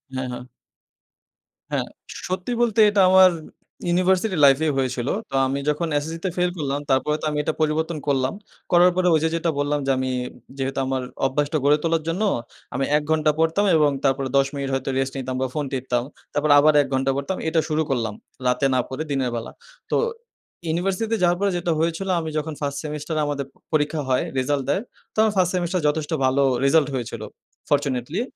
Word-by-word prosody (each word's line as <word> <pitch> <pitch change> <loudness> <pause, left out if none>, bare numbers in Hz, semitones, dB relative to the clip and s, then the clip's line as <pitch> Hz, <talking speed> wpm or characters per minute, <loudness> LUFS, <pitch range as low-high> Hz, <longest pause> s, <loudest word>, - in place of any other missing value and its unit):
হ্যাঁ, 130 0 -2
হ্যাঁ। 125 - -6 1.3
হ্যাঁ, - - -1 0.4
সত্যি 185 +5 -3
বলতে 230 -2 +1
এটা 205 -1 +3
আমার 185 0 +7 0.6
ইউনিভার্সিটি 185 +3 +2
লাইফ 135 -1 +6
এই - - +2
হয়েছিল। 130 -2 -1 0.2
তো - - -3
আমি 135 +1 -1
যখন 150 +3 0
এসএসসিতে 165 +5 -3
ফেইল 180 0 +2
করলাম, 140 -2 -2
তারপরে 135 +3 +2
তো - - -3
আমি 150 - -3
এটা 160 - -1
পরিবর্তন 155 +1 0
করলাম। 135 -2 +1 0.4
করার 175 +1 +6
পরে 185 0 +2
ওই 160 - +4
যে, 160 - +2
যেটা 165 0 0
বললাম 145 +1 0
যে, 135 - +2
আমি 130 0 -1 0.5
যেহেতু 135 0 -2
আমার 130 0 -1 0.2
অভ্যাসটা 145 +3 0
গড়ে 145 +1 +5
তোলার 165 -1 +1
জন্য 175 +6 -1 0.5
আমি 135 +1 0
১ 150 - -2
ঘণ্টা 155 -1 +3
পড়তাম 165 +5 +2
এবং 150 -2 +4
তারপরে 135 0 +1
১০ 135 0 +4
মিনিট 140 -1 -3
হয়তো 135 0 -1
রেস্ট 135 0 -1
নিতাম 130 -1 -3
বা 130 - +1
ফোন 150 -1 -1
টিপতাম। 125 -2 -1 0.3
তারপর 145 +1 0
আবার 155 +1 +5
১ 140 - -2
ঘণ্টা 135 +1 +1
পড়তাম। 140 +7 -2
এটা 160 +1 +2
শুরু 155 0 +1
করলাম। 115 -5 -1 0.3
রাতে 125 +2 +2
না 130 - +3
পড়ে 130 +4 -3
দিনের 135 -3 0
বেলা। 115 0 -5 0.4
তো - - +2 0.7
ইউনিভার্সিটিতে 190 +7 0
যাওয়ার 175 0 +3
পরে 200 0 +1
যেটা 175 0 -1
হয়েছিল, 165 +4 -1
আমি 160 -1 -4
যখন 155 +1 -2
First 140 -1 -2
সেমিস্টারে 150 +1 -3
আমাদের 140 -1 -2 0.3
পরীক্ষা 150 0 +1
হয়, 130 0 +2 0.2
রেজাল্ট 140 +1 0
দেয়। 190 - +1 0.3
তো - - -22
আমার 220 -1 +3
1First 180 -1 +3
সেমেস্টার 180 0 0
যথেষ্ট 150 +1 -1
ভালো 135 +2 +3 0.2
রেজাল্ট 145 +1 +4
হয়েছিল, 115 -3 -4 0.5
ফরচুনেটলি। 145 - 0
150 Hz, 185 wpm, -23 LUFS, 135-170 Hz, 1.3 s, আমার